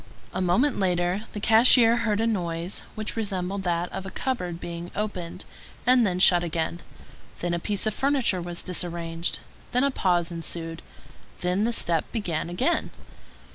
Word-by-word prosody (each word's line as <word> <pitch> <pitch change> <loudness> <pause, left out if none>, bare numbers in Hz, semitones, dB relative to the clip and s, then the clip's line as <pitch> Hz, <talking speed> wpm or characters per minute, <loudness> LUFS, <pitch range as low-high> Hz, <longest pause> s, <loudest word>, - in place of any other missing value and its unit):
A - - -2
moment 235 +11 +2
later 180 +2 0
the 210 - -4
cashier 230 +2 +6
heard 215 -3 0
a 225 - +2
noise 175 -5 -2
which 215 0 -4
resembled 195 -3 -2
that 175 -1 0
of - - -5
a 190 - -6
cupboard 180 -9 -3
being 170 0 -6
opened, 190 -5 -4 0.4
and 250 -3 +5
then 180 -1 -1
shut 180 -1 +6
again; 170 0 -2 0.6
then 175 0 -1
a 170 - 0
piece 205 +4 0
of 215 - 0
furniture 265 -8 +1
was 175 0 -5
disarranged; 170 -2 -3 0.3
then 250 +2 +3
a 280 - +3
pause 175 -7 +1
ensued; 165 0 -4 0.6
then 180 +4 +1
the 235 - +1
step 170 -7 +1
began 175 -8 -2
again. 255 - 0
180 Hz, 160 wpm, -26 LUFS, 170-220 Hz, 0.6 s, cashier